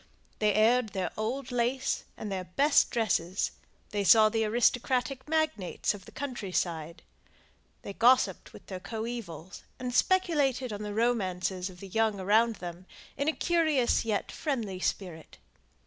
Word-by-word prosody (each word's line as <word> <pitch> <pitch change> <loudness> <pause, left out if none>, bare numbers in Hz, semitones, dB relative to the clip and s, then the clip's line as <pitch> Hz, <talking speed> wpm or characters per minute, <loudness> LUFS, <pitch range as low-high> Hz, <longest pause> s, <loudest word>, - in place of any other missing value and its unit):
They 210 -2 +2
aired 225 +1 +3
their 185 -3 -2
old 245 +6 -3
lace 245 +2 0
and 210 - -5
their 185 -1 -3
best 280 - +3
dresses; 195 -5 0 0.4
they 205 -1 -1
saw 215 +2 +7
the 225 0 0
aristocratic 250 +4 +1
magnates 310 - 0
of 195 -3 -11
the - - -13
country 250 -9 -5
side; 165 -2 -2 0.8
they 200 - -6
gossipped 245 +5 +3
with - - -14
their 185 -2 -6
coevals, 220 -6 -6 0.2
and 250 -1 -4
speculated 280 - +2
on 205 - -5
the 210 -1 -5
romances 190 -5 0
of 180 -1 -14
the 195 - -8
young 220 +1 0
around 220 +4 +3
them 175 0 -8 0.3
in 280 - -2
a - - +4
curious 315 -7 +2
yet 215 -3 -2
friendly 230 - -3
spirit. 175 -4 -4
220 Hz, 145 wpm, -29 LUFS, 190-250 Hz, 0.8 s, saw